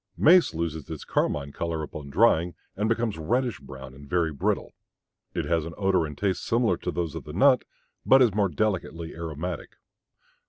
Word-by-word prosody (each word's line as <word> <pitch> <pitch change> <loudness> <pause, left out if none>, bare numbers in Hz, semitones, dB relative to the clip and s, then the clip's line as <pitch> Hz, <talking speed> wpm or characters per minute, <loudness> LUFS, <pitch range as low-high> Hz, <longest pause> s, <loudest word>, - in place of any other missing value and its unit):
Mace 170 - +5
loses 80 -2 -3
its 80 -3 -6
carmine 70 -1 0
color 80 +1 -3
upon 75 -1 -7
drying 90 -1 +3 0.2
and 105 +3 0
becomes 115 -5 0
reddish 120 +7 0
brown 65 -1 -10
and 70 +1 -13
very 85 -2 +1
brittle. 70 - -1 0.6
It - - -1
has 85 -2 +1
an 85 +1 -7
odor 95 -5 +2
and 75 - -9
taste 100 -2 -1
similar 115 0 +2
to - - -4
those 85 -2 -2
of 80 -3 -6
the - - -9
nut, - - +4 0.4
but 135 - +6
is 120 -6 +4
more 100 -1 +2
delicately 85 -2 -2
aromatic. 80 +1 -5
85 Hz, 175 wpm, -26 LUFS, 80-105 Hz, 0.6 s, but